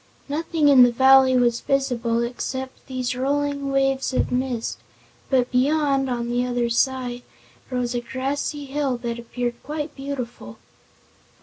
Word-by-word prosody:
Nothing 310 +1 0
in 275 -3 +7
the 245 -1 +7
valley 265 +1 +6
was 240 -1 +2
visible 245 -4 0
except 260 +2 -5
these 255 -2 -2
rolling 280 +1 -1
waves 270 0 +1
of - - +1
mist, 250 -2 -2 0.5
but 255 -2 +2
beyond, 275 +1 +2
on 240 -1 -2
the 245 +1 +1
other 245 -1 -1
side, 250 0 0 0.5
rose 250 -2 -2
a 240 - -1
grassy 275 +4 -3
hill 275 -2 -1
that 235 -1 -4
appeared 240 0 -4
quite 295 0 -5
beautiful. 250 - -6
260 Hz, 135 wpm, -23 LUFS, 245-275 Hz, 0.5 s, in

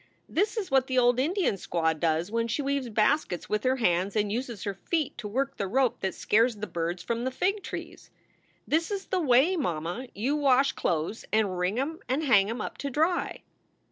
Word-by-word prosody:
This 405 +7 0
is 395 -8 -3
what 265 -1 +3
the 260 - -1
old 245 0 +4
Indian 330 - +1
squaw 165 -3 0
does 160 +3 0
when 230 0 0
she 260 +5 -1
weaves 275 -2 -1
baskets 215 - +1
with 210 0 0
her 255 +1 +2
hands 190 -4 +1
and 205 -1 +1
uses 235 -2 -4
her 200 - -2
feet 310 - -2
to 210 - -5
work 265 +6 -2
the 200 - -2
rope 255 +4 +1
that 190 - -2
scares 230 +2 +2
the 210 0 -5
birds 170 -1 -3
from 235 0 -2
the 260 - 0
fig 390 +10 0
trees. - - -8 0.6
This 325 +2 +1
is 395 -2 -3
the 375 -2 +1
way, 280 +5 +4
mamma, 175 - -3
you 255 +8 0
wash 275 -2 +4
clo 160 -2 -1
es 220 - -9
and 210 -4 +2
wring 180 +4 -1
em 315 +4 -2
and 270 +5 0
hang 210 -8 +4
em 230 - -3
up - - -6
to 280 - -3
dry." 320 +6 0
245 Hz, 210 wpm, -28 LUFS, 200-280 Hz, 0.6 s, old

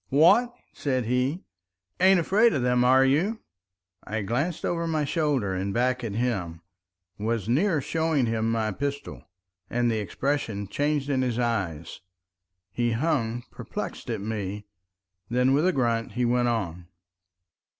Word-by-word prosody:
"What!" 170 - +5 0.2
said 130 -4 -1
he. 125 - 0 0.6
"Ain't 190 0 +6
afraid 210 +7 +3
of 130 - 0
them, 125 0 +3
are 130 +2 +5
you?" 175 +12 +1 0.6
I 110 +1 -3
glanced 140 - -1
over 170 -1 -1
my 155 -2 0
shoulder 140 - 0
and 95 +1 -2
back 125 +1 +1
at 110 -3 -3
him, 95 -9 -2 0.6
was 110 -1 -1
near 155 - +2
showing 160 -2 0
him 115 0 0
my 110 -1 0
pistol, 140 +6 -4 0.5
and 120 0 +1
the 110 - 0
expression 110 -2 -2
changed 145 +4 -1
in 130 -2 +1
his 125 -3 -1
eyes. 95 -10 -2 0.7
He 120 +2 0
hung 120 -3 0
perplexed - - -6
at - - -2
me. 105 -1 -4 0.6
Then 125 +2 +3
with 150 +6 +3
a - - +4
grunt 115 - 0
he 125 +2 0
went 120 0 +2
on. 90 -7 -2
125 Hz, 145 wpm, -26 LUFS, 110-145 Hz, 0.7 s, Ain't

